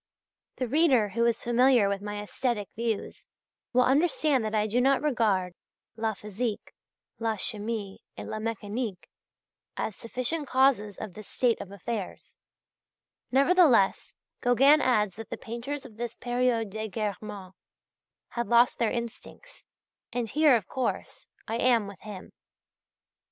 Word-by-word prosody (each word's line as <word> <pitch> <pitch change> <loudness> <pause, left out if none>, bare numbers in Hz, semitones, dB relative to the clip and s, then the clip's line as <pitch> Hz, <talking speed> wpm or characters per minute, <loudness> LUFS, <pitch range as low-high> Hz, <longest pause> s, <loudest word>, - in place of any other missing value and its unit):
The 255 - -2
reader 265 -6 +3
who 230 +4 0
is 235 -1 0
familiar 240 -2 +4
with 200 0 -2
my 205 0 -5
aesthetic 210 -1 -2
views, 225 -2 -3 0.4
will 250 0 +4
understand 285 -1 +2
that 215 0 -2
I 210 0 +2
do 230 +4 +1
not 270 +1 +4
regard 210 -10 +1 0.4
"la 220 -1 -1
physique, 210 +2 -4 0.5
la 225 -1 0
chimie 210 -1 -3 0.2
et - - -6
la 215 - -4
mécanique," 215 -2 -4 0.7
as 215 - -2
sufficient 255 +6 -3
causes 255 -7 +2
of 215 -4 -7
this 215 +2 -11
state 240 -3 +1
of 190 - -9
affairs; 200 +1 -6 1.0
nevertheless 275 - +4 0.3
Gauguin 270 +5 +5
adds 210 -7 +1
that 225 -2 -8
the - - -5
painters 260 +4 -6
of 225 -5 -13
this 235 0 -4
"période 245 -3 0
d'égarement," 210 -2 -5 0.8
had 235 0 -3
lost 240 +1 +4
their 230 - +2
instincts, 235 - -7 0.5
and 240 -2 -2
here, 295 +1 +5
of 225 - -1
course, 260 - -3 0.2
I 225 +1 -2
am 235 -3 +3
with 200 -1 -10
him. 205 -3 -9
230 Hz, 135 wpm, -28 LUFS, 210-255 Hz, 1.0 s, Gauguin